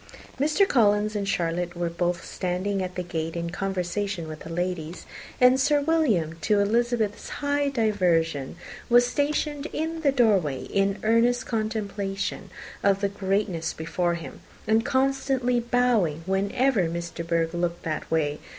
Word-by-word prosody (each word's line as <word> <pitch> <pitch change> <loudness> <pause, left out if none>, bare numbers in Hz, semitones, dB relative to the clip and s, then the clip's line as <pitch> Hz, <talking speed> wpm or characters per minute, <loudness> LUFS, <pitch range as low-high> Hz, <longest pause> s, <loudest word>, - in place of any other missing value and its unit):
Mr. 310 +8 +3
Collins 215 - +3
and 200 -1 -1
Charlotte 175 0 -1
were 175 0 -1
both 170 +1 -2
standing 185 +2 -2
at 185 -1 -4
the 180 - -2
gate 165 -1 -4
in 170 0 -3
conversation 190 -1 -2
with 155 -1 -7
the - - -9
ladies; 175 -1 -3 0.3
and 250 +1 +6
Sir 290 +2 +3
William, 260 - +1
to 205 +7 +2
Elizabeth's 225 0 0
high 285 0 0
diversion, 175 - +1 0.3
was 245 0 +6
stationed 290 +2 -1
in 320 +1 -3
the 285 -3 +3
doorway, 200 - +2
in 195 0 0
earnest 235 +3 +3
contemplation 205 -3 -3 0.3
of 195 -1 +3
the 200 - +1
greatness 195 -4 -1
before 170 +2 -1
him, 170 - -8 0.3
and 220 +1 +3
constantly 265 -2 +1
bowing 235 -10 +1
whenever 200 +1 +1
Miss 170 0 -4
De 170 - -5
Bourgh 165 0 0
looked 175 0 -2
that 155 -2 -3
way. 150 -2 0
200 Hz, 145 wpm, -26 LUFS, 170-245 Hz, 0.3 s, and